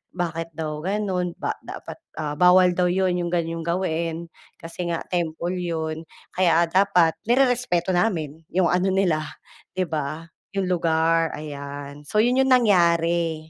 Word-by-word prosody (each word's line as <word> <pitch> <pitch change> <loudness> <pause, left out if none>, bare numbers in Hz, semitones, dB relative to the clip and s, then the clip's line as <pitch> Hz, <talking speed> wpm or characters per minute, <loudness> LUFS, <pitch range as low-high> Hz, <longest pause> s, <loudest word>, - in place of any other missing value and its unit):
bakit 165 -2 -3
daw 155 -1 -4
gano'n, 185 -1 -2
ba - - -1
dapat - - -9 0.2
ah, 150 -1 -3
bawal 180 0 +6
daw 180 -1 +2
'yon 180 0 +1
'yong 175 - -2
ganyong 165 -1 -2
gawain 170 -1 -2 0.3
kasi 170 +1 -6
nga 165 - -2
temple 175 +1 -2
'yon. 160 -2 -3 0.3
Kaya 170 -2 +4
dapat 180 -2 +3
nirerespeto 245 -8 +2
namin, 165 -5 -1
'yong 180 -1 +2
ano 185 +2 +2
nila, 160 -6 +1 0.5
'di 185 - +1
ba, 155 +1 -3 0.3
'yong 190 -2 0
lugar, 165 -1 +2
ayan. 145 -1 -8
So, 210 - 0
'yon 250 +2 +2
'yong 265 - +3
nangyari. 170 -7 +3
170 Hz, 140 wpm, -23 LUFS, 160-185 Hz, 0.5 s, bawal